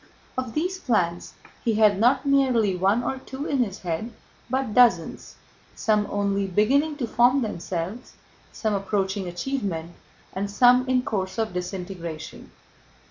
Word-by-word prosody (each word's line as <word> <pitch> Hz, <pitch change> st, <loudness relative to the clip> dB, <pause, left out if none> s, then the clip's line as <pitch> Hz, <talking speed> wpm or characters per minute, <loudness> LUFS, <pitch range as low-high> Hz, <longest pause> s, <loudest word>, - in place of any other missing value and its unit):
Of 255 Hz, -3 st, -4 dB
these 365 Hz, +4 st, -1 dB
plans 175 Hz, -, -1 dB, 0.3 s
he 225 Hz, -2 st, +1 dB
had 210 Hz, -2 st, +4 dB
not 255 Hz, +4 st, +3 dB
merely 255 Hz, -8 st, +3 dB
one 195 Hz, +6 st, +2 dB
or 265 Hz, -, -2 dB
two 265 Hz, +2 st, -7 dB
in 280 Hz, -3 st, -1 dB
his 210 Hz, -5 st, -1 dB
head 180 Hz, +6 st, -3 dB, 0.4 s
but 260 Hz, -3 st, -1 dB
dozens, 205 Hz, -10 st, +3 dB, 0.4 s
some 210 Hz, -1 st, +1 dB
only 200 Hz, -1 st, 0 dB
beginning 270 Hz, -, +2 dB
to 260 Hz, -, -1 dB
form 245 Hz, +4 st, +3 dB
themselves, 185 Hz, +2 st, -5 dB, 0.4 s
some 220 Hz, -2 st, -2 dB
approaching 195 Hz, -1 st, -1 dB
achievement, 175 Hz, -4 st, -3 dB, 0.4 s
and 200 Hz, +1 st, -3 dB
some 250 Hz, +5 st, +4 dB
in 255 Hz, -1 st, +2 dB
course 190 Hz, -4 st, -3 dB
of 220 Hz, -3 st, -1 dB
disintegration. 180 Hz, -3 st, -6 dB
215 Hz, 135 wpm, -25 LUFS, 190-255 Hz, 0.4 s, had